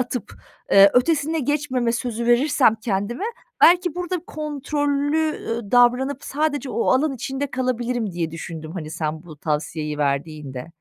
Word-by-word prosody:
atıp, 250 -3 -4 0.4
eee, 195 0 +8
ötesine 310 +4 +2
geçmeme 260 -4 0
sözü 235 -1 -3
verirsem 240 -2 +4
kendime; 220 - -2 0.4
belki 355 -1 +5
burada 360 0 -2
kontrollü, 295 +1 -1
ııı, 230 -3 -3
davranıp 250 +3 +3
sadece 290 -2 -1
o 235 - -1
alan 275 +2 +2
içinde 270 +3 -4
kalabilirim 245 -4 -1
diye 170 -2 -2
düşündüm, 165 -1 -7
hani, 155 -5 -6
sen 155 0 -3
bu 160 -4 -12
tavsiyeyi 150 0 -3
verdiğinde. 140 -2 -2
245 Hz, 135 wpm, -22 LUFS, 175-285 Hz, 0.4 s, eee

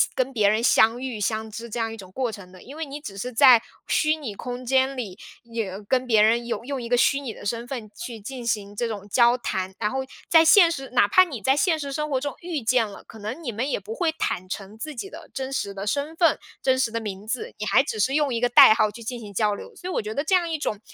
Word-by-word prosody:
跟 255 - +2
相 270 - -14
别 210 -4 +3
人 220 +2 +1
相 230 0 +4
遇、 250 -5 -4
相 220 +1 -1
知 235 +2 -7
这 235 +2 -4
样 225 0 -2
一 - - -6
种 190 -4 -12
过 250 +1 -2
程 190 -4 -11
的。 185 - -14
因 275 - -11
为 320 0 -4
你 285 +1 -7
只 200 -9 -9
是 250 +5 -4
在 245 -1 +7 0.3
虚 310 0 +2
拟 280 -9 -6
空 250 +2 -6
间 265 +1 +2
里， 200 -7 -5 0.3
有 220 -4 -5
跟 255 -1 +1
别 220 -3 +4
人 230 +2 +3
有 235 - -3
用 275 -1 -4
一 235 - -6
个 245 - +3
虚 275 +3 +3
拟 250 -5 -5
的 - - -12
身 230 +3 -2
份 240 -5 -6
去 245 -10 -7
进 245 +3 -7
行 205 -3 -2
这 235 +3 -1
种 205 -3 -6
交 240 +3 +4
谈。 190 -5 -3
然 210 - 0
后 265 - -2 0.3
在 325 -1 +6
现 335 +2 +7
实 270 -4 -5
哪 245 -5 +3
怕 370 - +6
你 295 -10 -6
在 265 +7 +3
现 320 +1 +2
实 280 -1 -5
生 300 +1 -2
活 270 -3 0
中 285 +1 -4
遇 335 -5 -3
见 235 0 +2
了， 200 - -12
可 220 - -13
能 220 +10 -6
你 240 - -3
们 245 +7 -2
也 265 - -1
不 215 +3 -7
会 335 -3 +1
坦 185 - -3
诚 200 +2 -7
自 300 +7 -6
己 325 +11 -6
的 325 -2 -12
真 265 0 -4
实 200 -6 -2
的 195 +1 -6
身 285 +6 -1
份、 335 -4 +4 0.2
真 260 -1 +2
实 255 -4 +1
的 230 - -2
名 205 -2 -6
字， 240 +3 -4
你 210 - -3
还 265 - +4
只 275 - -4
是 260 +6 +2
用 295 -4 +1
一 230 - -2
个 245 - +2
代 235 - +9
号 215 -2 +2
去 230 - -11
进 240 +2 -5
行 205 -2 -10
交 210 +1 +1
流。 460 - -10
所 365 - -6
以 - - -3
我 - - 0
觉 215 0 -5
得 285 +5 -1
这 375 - +3
样 345 -2 +1
一 320 - -1
种 215 -8 -3
240 Hz, 310 characters per minute, -24 LUFS, 215-275 Hz, 0.3 s, 代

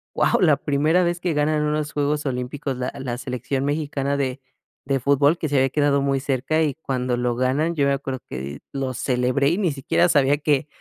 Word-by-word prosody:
wao, - - +2
la - - +5
primera 155 +5 +2
vez 175 0 0
que 175 -1 -1
ganan 150 +1 +1
unos 150 0 -1
Juegos 145 +1 0
Olímpicos 135 +1 -3
la 125 0 -3
la 125 -2 -4
selección 130 +1 -3
mexicana 145 -1 -1
de 135 -1 -2 0.4
de 135 0 0
fútbol, 140 +4 +3
que 155 - -2
se 145 - -1
había 135 0 +3
quedado 145 0 +2
muy 135 0 +1
cerca 135 +3 0
y 150 -3 0
cuando 130 -4 -2
lo 120 0 -1
ganan, 135 +7 0
yo 145 -3 +2
me 140 - +2
acuerdo 135 -1 -4
que 65 - -6
di 70 +2 -6
lo 135 -2 -2
celebré, 125 +3 +1
y 170 - 0
ni 185 -6 +1
siquiera 145 +5 +1
sabía 145 -2 +3
que 145 -1 +1
140 Hz, 210 wpm, -23 LUFS, 130-150 Hz, 0.4 s, la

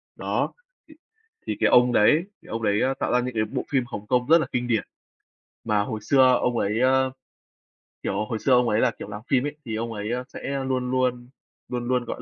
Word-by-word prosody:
Đó, - - -2 0.3
thì 310 - -16 0.5
thì - - -2
cái - - +4
ông 125 0 +5
đấy 150 +11 +4 0.2
cái - - -17
ông 115 0 -3
đấy, 105 -1 +2
ơ, 135 +1 +1
tạo - - 0
ra 125 - +4
những 125 -1 -4
cái 110 -1 +1
bộ 105 - -4
phim 130 -3 +1
Hồng 105 -3 -7
Kông 125 0 +1
rất 165 +2 +7
là 155 - -1
kinh 125 0 -1
điển. 115 -4 +1 0.8
Mà 105 -2 +1
hồi 110 +1 -4
xưa 130 +3 +5
ông 120 -1 0
ấy, 105 +3 0
ơ, 130 0 +3 0.9
kiểu, 100 +2 -1
hồi 110 +1 -4
xưa 135 - 0
ông 125 -1 +4
ấy 105 - +2
là, 125 - +3
kiểu, 100 - -7
làm 105 +1 -7
phim 135 0 +2
ấy, 145 - -4
thì 110 -2 -4
ông 115 +1 -3
ấy, 105 +2 -4
ơ, 125 +1 -2
sẽ 135 -1 -4
luôn 130 -1 -1
luôn 125 -1 0 0.4
luôn 120 -1 -3
luôn, 125 -1 0
gọi - - -6
125 Hz, 235 wpm, -24 LUFS, 110-130 Hz, 0.9 s, rất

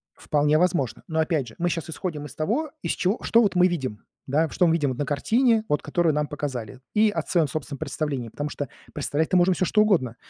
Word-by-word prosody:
Вполне 150 +1 +2
возможно. 165 -8 0
Но, 160 -1 0
опять 155 -5 0
же, 110 - -12
мы 175 - +1
щас 170 -1 -3
исходим 160 -3 -4
из - - -11
того, 240 - -1
из - - 0
чего 195 +5 0
что 230 - +4
вот 200 -4 +1
мы 180 0 +5
видим, 135 - -3 0.2
да, 150 +5 +2
в - - -14
что 180 - +3
мы 165 - +3
видим 150 -5 +1
на 130 +3 -3
картине, 225 - +2
вот 150 - +1
которую 160 +1 +1
нам 150 0 0
показали, 130 -5 -5
и 215 0 +4
от 165 -6 -4
своём 165 -4 +3
собственном 140 0 -5
представлении, 140 -6 -3
потому 145 +6 -4
что 145 -2 -4 0.2
представлять-то 155 +4 0
можно 180 +1 +4
всё 185 - 0
что 210 - +2
угодно. 160 - +1
155 Hz, 225 wpm, -25 LUFS, 145-180 Hz, 0.2 s, мы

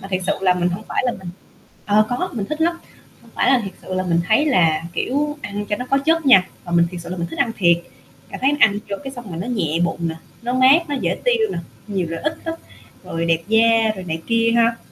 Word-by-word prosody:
Mà 195 - -9
thiệt 185 -1 -2
sự - - +2
là 185 -1 +3
mình 180 0 0
hông 180 +5 -4
phải - - 0
là 245 - +1
mình 185 -2 -9 0.6
ờ, 215 +1 +4
có 255 +10 -2
mình 205 -5 -3
thích 305 +1 -5
lắm, 335 +1 +2 0.4
không - - -20
phải - - +2
là 260 -2 +4
thiệt 195 - -6
sự 185 - -6
là 185 - 0
mình 170 -1 +1
thấy 260 +8 +4
là, 165 - +3
kiểu, 295 +3 -1
ăn 205 0 -5
cho 205 - 0
nó 250 - -5
có 275 - +4
chất 320 +1 +1
nha, 190 -8 +6 0.2
mà 175 - -7
mình 170 0 +4
thiệt 180 - -7
sự 170 - -9
là 185 - -4
mình 170 -1 -3
thích 165 - -8
ăn 230 - +1
thiệt, 170 -3 +5 0.5
cảm - - -7
thấy 265 - +3
mình 290 - -3
ăn 205 -2 +5
vô 200 - -1
cái 270 - -6
xong 240 -6 -9
là 165 - -6
nó 180 +7 -4
nhẹ 170 -10 -1
bụng 170 0 -2
nè, 160 - -4 0.3
nó 245 +2 -2
mát, 275 +6 +5
nó 290 - -2
dễ 270 - -1
tiêu - - +3
nè, - - -3 0.3
nhiều 195 -5 -2
lợi 165 - -4
ích 315 +2 -2
lắm, 330 -1 -3 0.5
rồi 165 0 -3
đẹp 165 0 +2
da 225 0 +4
rồi 185 - -7
này 160 -1 -4
kia 230 0 +2
ha. 230 0 +3
215 Hz, 275 wpm, -20 LUFS, 180-260 Hz, 0.6 s, nha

